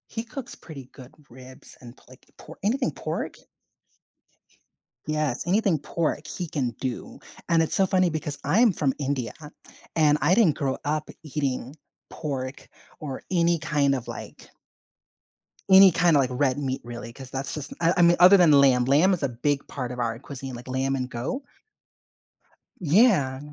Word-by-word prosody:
He 225 Hz, -, -5 dB
cooks 250 Hz, +2 st, -8 dB
pretty 140 Hz, -5 st, -11 dB
good 130 Hz, +1 st, -15 dB, 0.2 s
ribs 130 Hz, +1 st, -14 dB
and 120 Hz, 0 st, -13 dB
p -, -, -24 dB
like, 130 Hz, 0 st, -18 dB
por 160 Hz, -, -13 dB
anything 250 Hz, +6 st, 0 dB
pork. -, -, -5 dB, 1.7 s
Yes, 155 Hz, -2 st, -2 dB
anything 190 Hz, -3 st, +2 dB
pork 155 Hz, 0 st, -3 dB
he 175 Hz, +2 st, -5 dB
can 135 Hz, -6 st, -2 dB
do, 130 Hz, -3 st, -5 dB, 0.3 s
and 165 Hz, -1 st, +4 dB
it's 160 Hz, -, -3 dB
so 195 Hz, -, +2 dB
funny 185 Hz, -1 st, +2 dB
because 150 Hz, -2 st, -4 dB
I'm 215 Hz, -, +4 dB
from 145 Hz, -6 st, 0 dB
India 135 Hz, -5 st, -2 dB
I 150 Hz, -, -9 dB, 0.5 s
and 150 Hz, -2 st, +4 dB
I 155 Hz, +7 st, +4 dB
didn't 200 Hz, -10 st, +3 dB
grow 135 Hz, -3 st, -1 dB
up 155 Hz, +1 st, -2 dB
eating 140 Hz, -3 st, -3 dB, 0.4 s
pork 135 Hz, -2 st, -5 dB, 0.3 s
or 140 Hz, -4 st, -6 dB
any 170 Hz, -1 st, +2 dB
kind 145 Hz, -3 st, +1 dB
of 125 Hz, -3 st, -6 dB
like -, -, -10 dB, 1.2 s
Any 190 Hz, 0 st, +9 dB
kinda, 165 Hz, -2 st, +3 dB
like, 130 Hz, -2 st, +1 dB
red 130 Hz, 0 st, +1 dB
meat 135 Hz, -2 st, -3 dB
really, 120 Hz, -1 st, -8 dB
'cause 130 Hz, +1 st, -11 dB
that's 135 Hz, +1 st, -5 dB
just 150 Hz, -3 st, -6 dB
I 170 Hz, +1 st, +3 dB
I -, -, +4 dB
mean, 170 Hz, 0 st, +5 dB
other 185 Hz, +3 st, +8 dB
than 175 Hz, -4 st, +5 dB
lamb 135 Hz, -3 st, +5 dB
lamb 150 Hz, +9 st, +4 dB
is 180 Hz, -, -2 dB
a 140 Hz, -, +1 dB
big 140 Hz, +4 st, -2 dB
part 125 Hz, -3 st, -5 dB
of 125 Hz, -, -7 dB
our 115 Hz, -1 st, -1 dB
cuisine, 135 Hz, -1 st, -8 dB
like, 120 Hz, +2 st, -11 dB
lamb 130 Hz, +1 st, -1 dB
and 130 Hz, -1 st, -3 dB
goat. 130 Hz, -, -4 dB, 1.4 s
Yeah, 165 Hz, -, +3 dB
145 Hz, 170 wpm, -25 LUFS, 130-170 Hz, 1.7 s, Any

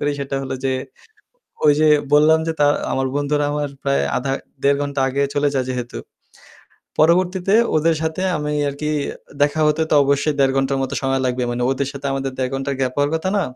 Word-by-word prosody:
করি 145 Hz, 0 st, 0 dB
সেটা 140 Hz, 0 st, -4 dB
হলো 135 Hz, 0 st, -4 dB
যে 135 Hz, -, +1 dB, 0.9 s
ওই 150 Hz, -, +7 dB
যে 155 Hz, -, +5 dB, 0.2 s
বললাম 155 Hz, +2 st, +6 dB
যে 165 Hz, -, 0 dB
তা 145 Hz, -, +5 dB, 0.3 s
আমার 135 Hz, 0 st, 0 dB
বন্ধুরা 145 Hz, 0 st, 0 dB
আমার 145 Hz, 0 st, -2 dB
প্রায় 140 Hz, 0 st, +1 dB
আধা 135 Hz, +1 st, -1 dB, 0.3 s
১.৫ 140 Hz, 0 st, +3 dB
ঘণ্টা 140 Hz, -1 st, -3 dB
আগে 140 Hz, +2 st, 0 dB
চলে 145 Hz, 0 st, +2 dB
যায় 130 Hz, -2 st, 0 dB
যেহেতু। 125 Hz, -1 st, -4 dB, 1.0 s
পরবর্তীতে 180 Hz, +4 st, +3 dB, 0.2 s
ওদের 160 Hz, +1 st, +3 dB
সাথে 160 Hz, +3 st, -2 dB
আমি 150 Hz, 0 st, -3 dB, 0.2 s
আরকি 150 Hz, +2 st, -3 dB, 0.5 s
দেখা 145 Hz, +2 st, +2 dB
হতে 150 Hz, +1 st, +2 dB
তো -, -, +3 dB
অবশ্যই 140 Hz, +2 st, +1 dB
১.৫ 135 Hz, -1 st, +3 dB
ঘন্টার 135 Hz, 0 st, +1 dB
মত 135 Hz, -, -3 dB
সময় 135 Hz, 0 st, 0 dB
লাগবে। 125 Hz, 0 st, -1 dB
মানে 120 Hz, +1 st, -2 dB
ওদের 135 Hz, 0 st, -1 dB
সাথে 140 Hz, 0 st, -6 dB
আমাদের 135 Hz, 0 st, -2 dB
১.৫ 130 Hz, -1 st, -1 dB
ঘন্টার 135 Hz, +1 st, -2 dB
গ্যাপ 130 Hz, -1 st, 0 dB
হওয়ার 145 Hz, 0 st, +1 dB
কথা 160 Hz, +3 st, -1 dB
না। 200 Hz, -, +2 dB
140 Hz, 195 wpm, -20 LUFS, 135-150 Hz, 1.0 s, ওই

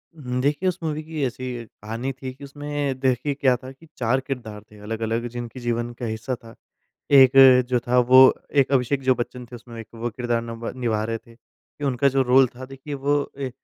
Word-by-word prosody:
उम, 125 Hz, -5 st, -4 dB
देखिए 145 Hz, +7 st, +1 dB
उस 180 Hz, -, -4 dB
मूवी 155 Hz, -1 st, -2 dB
की 155 Hz, -2 st, -4 dB
ऐसी 125 Hz, -1 st, -5 dB
कहानी 115 Hz, +5 st, -6 dB
थी, 130 Hz, 0 st, -7 dB
कि 140 Hz, +2 st, -15 dB
उसमें 145 Hz, -1 st, -4 dB
देखिए 130 Hz, +2 st, 0 dB
क्या 135 Hz, -2 st, +2 dB
था 130 Hz, -, -8 dB
कि 145 Hz, +5 st, -18 dB
4 125 Hz, +2 st, +1 dB
किरदार 125 Hz, -6 st, -6 dB
थे 105 Hz, -, -15 dB
अलग-अलग 115 Hz, +2 st, -3 dB
जिनकी 120 Hz, +1 st, -7 dB
जीवन 120 Hz, 0 st, -2 dB
का 120 Hz, +1 st, -6 dB
हिस्सा 115 Hz, +3 st, -3 dB
था। 115 Hz, -1 st, -15 dB, 0.6 s
एक 130 Hz, -1 st, +8 dB, 0.4 s
जो 125 Hz, -1 st, +2 dB
था 125 Hz, +1 st, +3 dB
वो 125 Hz, +1 st, +6 dB, 0.4 s
एक 135 Hz, -, 0 dB
अभिषेक 135 Hz, +1 st, +1 dB
जो 130 Hz, 0 st, +3 dB
बच्चन 125 Hz, +1 st, -5 dB
थे 120 Hz, -, -13 dB
उसमें 115 Hz, 0 st, -10 dB
एक 115 Hz, -, -10 dB
वो 115 Hz, +1 st, -3 dB
किरदार 120 Hz, 0 st, -2 dB
नब 115 Hz, 0 st, -7 dB
निभा 115 Hz, -4 st, -1 dB
रहे 115 Hz, 0 st, -3 dB
थे, 115 Hz, +1 st, -20 dB
कि 145 Hz, +4 st, -14 dB
उनका 135 Hz, 0 st, +2 dB
जो 135 Hz, 0 st, +2 dB
रोल 130 Hz, +1 st, +5 dB
था 130 Hz, -, -8 dB
देखिए 135 Hz, +2 st, -8 dB
वो 140 Hz, +1 st, 0 dB
ए 135 Hz, -2 st, -3 dB
125 Hz, 210 wpm, -23 LUFS, 115-135 Hz, 0.6 s, एक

